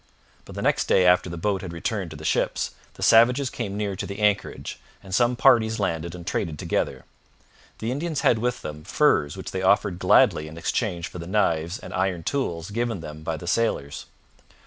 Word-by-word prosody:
But - - -11
the - - -4
next - - +2
day 95 - +4
after 90 0 +4
the 85 - -6
boat 100 +1 -1
had 95 - -6
returned 90 +2 -3
to 80 - -9
the 80 - -9
ships, - - 0 0.2
the - - -6
savages 125 +4 +5
came 100 -4 -4
near 100 -2 -2
to - - -4
the 100 - -6
anchorage, 105 -1 -1 0.2
and 95 -1 -9
some 120 +4 +3
parties 115 -2 +4
landed 85 -3 -2
and 85 -1 -9
traded 80 -4 -2
together. - - -2 0.7
The 115 +2 -3
Indians 155 +2 -2
had 115 - +3
with 125 +2 -2
them 75 0 -7
furs 75 - +2
which - - -6
they 95 - -3
offered 95 -1 +2
gladly 75 -3 +4
in 80 +1 -10
exchange 85 -1 -1
for 90 - -9
the 85 - -7
knives 85 -3 +1
and - - -10
iron 90 -1 -1
tools 85 - -2
given 115 -3 -2
them 75 -1 -8
by 80 0 -3
the 80 - -9
sailors. 85 -7 -1
95 Hz, 200 wpm, -24 LUFS, 85-110 Hz, 0.7 s, savages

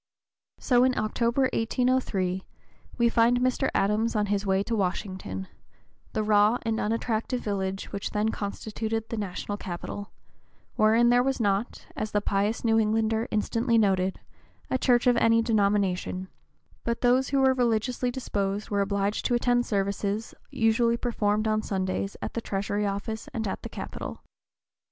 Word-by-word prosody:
So 245 -2 +3
in 255 0 +2
October, 235 +4 +1
1803, 225 -6 0 0.5
we 235 -1 +4
find 235 +1 +3
Mr. 255 +2 +1
Adams 215 +4 +1
on 210 -1 +2
his 200 0 -1
way 190 0 +2
to 230 - -2
Washington, 185 - -3 0.7
the 215 - 0
raw 210 +2 +4
and 225 0 -1
unattractive 230 +2 -1
village 195 -2 -3
which 200 0 -3
then 210 +1 0
constituted 220 +1 -4
the 230 - -3
national 205 0 -4
capital, 190 +3 -6 0.6
wherein 225 +2 +4
there 245 0 +5
was 270 +1 0
not, 205 +1 -1
as 215 0 -4
the 205 - +3
pious 205 +2 0
New 225 -1 +4
Englander 220 +1 +1
instantly 230 +2 +1
noted, 190 -3 +2 0.5
a 260 - +1
church 245 -2 +3
of 245 -1 +4
any 230 0 +4
denomination; 200 -4 0 0.5
but 235 0 -2
those 255 +2 +3
who 275 - +1
were 265 -1 +5
religiously 245 0 0
disposed 205 -5 -3
were 200 -1 +2
obliged 200 +1 0
to 245 - +2
attend 245 0 +2
services 200 +2 -1 0.2
"usually 230 +1 +2
performed 215 -3 0
on 215 0 +1
Sundays 190 0 -2
at - - -4
the 230 - -2
Treasury 205 0 -1
Office 220 +3 -4
and 220 -2 -2
at 190 - -4
the - - -7
Capitol." - - -7
220 Hz, 150 wpm, -27 LUFS, 200-235 Hz, 0.7 s, there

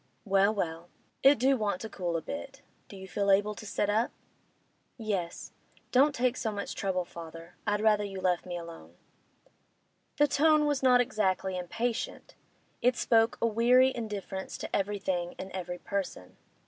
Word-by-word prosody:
'Well, 195 0 +4
well; 170 -4 -3 0.3
it 275 +1 +7
do 265 +3 +3
want 210 -6 -1
to 220 - -4
cool 175 -5 -2
a 160 - -5
bit. 275 -1 -7 0.2
Do 200 - -11
you 190 0 -9
feel 200 +1 -1
able 205 +2 +4
to 215 +1 -10
sit 205 - 0
up?' 220 +3 +2 0.9
'Yes. 195 -7 -3 0.4
Don't 275 +3 +4
take 250 0 +1
so 220 - -1
much 200 -1 -4
trouble, 185 -2 -1
father. 165 0 -10
I'd 205 0 +1
rather 210 -1 +4
you 195 -2 -5
left 180 -1 0
me 175 -1 -4
alone.' 165 - -10 1.2
The 295 - +6
tone 305 +1 +4
was 290 -2 +1
not 250 -2 +6
exactly 195 -6 0
impatient; 225 +7 -3 0.5
it 250 +1 +3
spoke 225 -1 +3
a - - +5
weary 245 +4 +4
indifference 205 -4 -5
to - - -4
everything 190 -3 -1
and 190 - -7
every 180 -1 -5
person. 190 - -4
205 Hz, 160 wpm, -30 LUFS, 185-235 Hz, 1.2 s, it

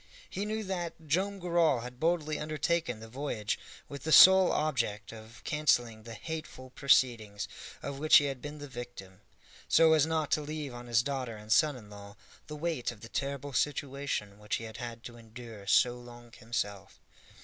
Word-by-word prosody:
He 200 - -4
knew 215 +1 -2
that 175 -4 -5
Joam 190 +7 0
Garral 170 -8 +2
had 125 +1 -9
boldly 160 -1 0
undertaken 155 -4 -1
the 110 - -9
voyage 115 -4 -3 0.3
with 140 -2 -8
the 160 - -3
sole 190 +2 +9
object 115 -9 -1
of 110 +1 -13
canceling 120 -7 +1
the 115 0 -9
hateful 130 -1 -7
proceedings 115 -7 +2 0.4
of 140 -1 -5
which 155 +1 +7
he 145 - +3
had 135 -3 -4
been 145 +1 -7
the 145 0 -8
victim, 120 -7 -9 0.5
so 160 0 +6
as 155 -1 +4
not 160 -2 -1
to 150 - +2
leave 150 -2 -5
on 120 0 -9
his 120 0 +3
daughter 130 -4 -3
and 105 +1 -10
son 150 +4 +4
in 105 -4 -12
law 100 0 -11 0.3
the 150 - -7
weight 155 -6 -2
of 110 -3 -14
the 115 - -10
terrible 140 +1 -3
situation 140 -6 -2
which 105 0 -2
he - - -5
had 110 0 -8
had 115 -1 -7
to 120 -1 -9
endure 115 -3 -11
so 125 +4 +4
long 120 -1 -13
himself. 115 -4 -5
130 Hz, 180 wpm, -30 LUFS, 115-155 Hz, 0.5 s, sole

